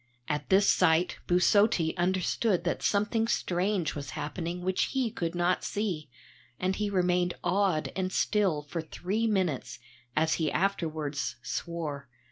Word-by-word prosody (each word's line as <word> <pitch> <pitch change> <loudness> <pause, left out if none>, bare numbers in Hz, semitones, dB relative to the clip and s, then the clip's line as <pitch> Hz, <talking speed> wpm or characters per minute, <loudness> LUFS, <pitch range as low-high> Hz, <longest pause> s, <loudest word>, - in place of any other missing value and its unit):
At 150 0 -2
this 195 +1 +5
sight 175 0 +3
Busotti 180 -1 +3
understood 185 +2 +1
that 175 - -1
something 220 +2 +1
strange 185 -4 0
was 140 -2 -6
happening 170 +3 -4
which 185 0 +1
he 260 -4 -1
could 170 -2 -3
not 175 +1 +1
see, 180 -9 -2 0.5
and 185 +1 0
he 210 -1 -1
remained 180 -2 +1
awed 190 -6 +1
and 185 -1 -1
still 190 -8 +1
for 160 +3 -4
three 195 +8 -2
minutes, 160 - -1 0.4
as 160 +1 +3
he 155 - +1
afterwards 160 -8 -1
swore. 150 -5 -4
180 Hz, 135 wpm, -29 LUFS, 160-195 Hz, 0.5 s, this